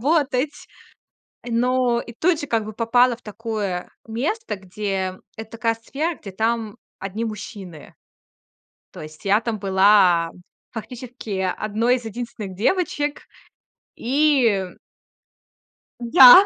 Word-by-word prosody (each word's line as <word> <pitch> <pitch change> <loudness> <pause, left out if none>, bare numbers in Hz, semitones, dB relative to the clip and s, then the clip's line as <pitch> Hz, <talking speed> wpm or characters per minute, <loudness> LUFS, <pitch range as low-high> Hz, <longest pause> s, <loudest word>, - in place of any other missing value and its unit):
работать. 285 0 +1 0.8
Но 245 0 +2
и 235 - -9
тут 330 +3 +2
же, 290 - -4
как 225 -4 0
бы, 215 - -6
попала 245 +2 +3
в - - -27
такое 210 -4 -3 0.2
место, 285 - -2
где 190 -1 -3 0.2
это 220 0 -8
такая 230 0 0
сфера, 290 +9 -3
где 200 - -9
там 220 +1 -1 0.2
одни 200 +4 -3
мужчины. 195 -6 -8 1.0
То - - -7
есть 155 +3 -11
я 205 +3 +4
там 225 -2 -3
была 190 -4 +5 0.4
фактически 230 -4 -6 0.2
1 225 +4 +1
из 240 - -10
единственных 220 -4 -6
девочек, 295 - 0 0.7
и 250 -7 +3 1.3
Да. 250 +10 +9
225 Hz, 115 wpm, -22 LUFS, 200-250 Hz, 1.3 s, Да